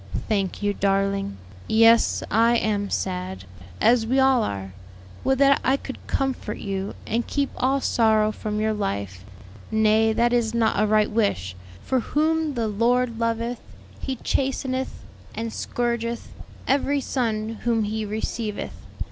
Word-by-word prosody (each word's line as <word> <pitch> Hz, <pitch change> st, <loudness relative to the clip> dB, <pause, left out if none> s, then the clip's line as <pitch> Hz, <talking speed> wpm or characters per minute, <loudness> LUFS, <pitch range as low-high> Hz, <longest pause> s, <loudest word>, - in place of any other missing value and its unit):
"Thank 200 Hz, -2 st, -1 dB
you, 205 Hz, 0 st, +1 dB
darling. 195 Hz, -, 0 dB, 0.3 s
Yes, 225 Hz, +1 st, +5 dB
I 230 Hz, +3 st, +4 dB
am 205 Hz, -3 st, 0 dB
sad, 95 Hz, 0 st, -3 dB, 0.4 s
as 235 Hz, 0 st, +4 dB
we 260 Hz, +3 st, +2 dB
all 265 Hz, -2 st, +4 dB
are. 95 Hz, -, -4 dB, 0.5 s
Would 265 Hz, 0 st, +2 dB
that 275 Hz, 0 st, +4 dB
I 265 Hz, +3 st, +3 dB
could 265 Hz, -, -8 dB
comfort 265 Hz, -5 st, -2 dB
you, 195 Hz, -1 st, -4 dB
and 235 Hz, +2 st, -1 dB
keep 280 Hz, -1 st, -1 dB
all 270 Hz, +2 st, +1 dB
sorrow 220 Hz, -3 st, +3 dB
from 210 Hz, 0 st, -4 dB
your 220 Hz, 0 st, +1 dB
life. 100 Hz, -, -3 dB, 0.5 s
Nay, 220 Hz, 0 st, +3 dB
that 235 Hz, +2 st, +2 dB
is 235 Hz, -2 st, +1 dB
not 225 Hz, -2 st, +2 dB
a 215 Hz, -, +3 dB
right 215 Hz, 0 st, +3 dB
wish, 150 Hz, -, 0 dB, 0.3 s
for 260 Hz, -, +1 dB
'whom 310 Hz, +3 st, 0 dB
the 230 Hz, -2 st, 0 dB
Lord 235 Hz, +2 st, +1 dB
loveth 230 Hz, +1 st, -1 dB, 0.4 s
He 265 Hz, -, -3 dB
chasteneth, 260 Hz, +1 st, -2 dB, 0.3 s
and 225 Hz, 0 st, -4 dB
scourgeth 235 Hz, -1 st, -2 dB, 0.4 s
every 280 Hz, +1 st, +2 dB
son 225 Hz, -5 st, -2 dB
whom 230 Hz, -2 st, +1 dB
He 215 Hz, +1 st, -2 dB
receiveth.' 215 Hz, 0 st, -4 dB
225 Hz, 140 wpm, -24 LUFS, 210-245 Hz, 0.5 s, Yes